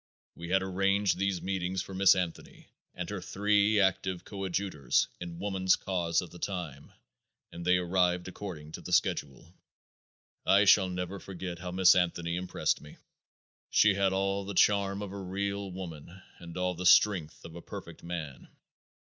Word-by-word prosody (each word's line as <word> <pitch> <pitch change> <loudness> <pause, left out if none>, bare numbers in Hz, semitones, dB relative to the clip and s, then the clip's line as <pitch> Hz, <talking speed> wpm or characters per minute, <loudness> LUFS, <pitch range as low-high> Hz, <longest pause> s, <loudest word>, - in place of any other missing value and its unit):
We 85 0 -9
had 95 +1 +2
arranged 95 0 +1
these 100 -2 -1
meetings 95 -1 -2
for 95 - -10
Miss 95 0 +5
Anthony 90 -3 -5 0.3
and 90 -1 -4
her 100 -3 -4
three 105 +2 +2
active 95 -2 0
coadjutors 95 - -1
in 85 -1 -7
woman's 95 -1 +1
cause 85 -2 -1
at 90 - -11
that 90 - -13
time, 85 -8 -5 0.6
and 85 - -8
they 90 +1 +4
arrived 90 0 +1
according 90 -6 -8
to - - -8
the - - -6
schedule. 75 +5 0 0.9
I 100 +2 +5
shall 95 -1 +6
never 90 +2 -4
forget 90 -2 -7
how 90 0 -6
Miss 90 0 +6
Anthony 85 -1 0
impressed 90 +1 -1
me. 75 - -13 0.7
She 105 -2 +5
had 100 0 +1
all 100 +1 0
the 100 0 -6
charm 100 +1 +3
of 100 - -6
a 100 0 -6
real 100 +1 -3
woman 90 0 -9 0.2
and 85 0 -9
all 90 0 0
the 90 +1 -1
strength 90 -6 +4
of 85 - -10
a 85 - -8
perfect 85 0 -9
man. 80 -6 -6
95 Hz, 165 wpm, -30 LUFS, 85-100 Hz, 0.9 s, shall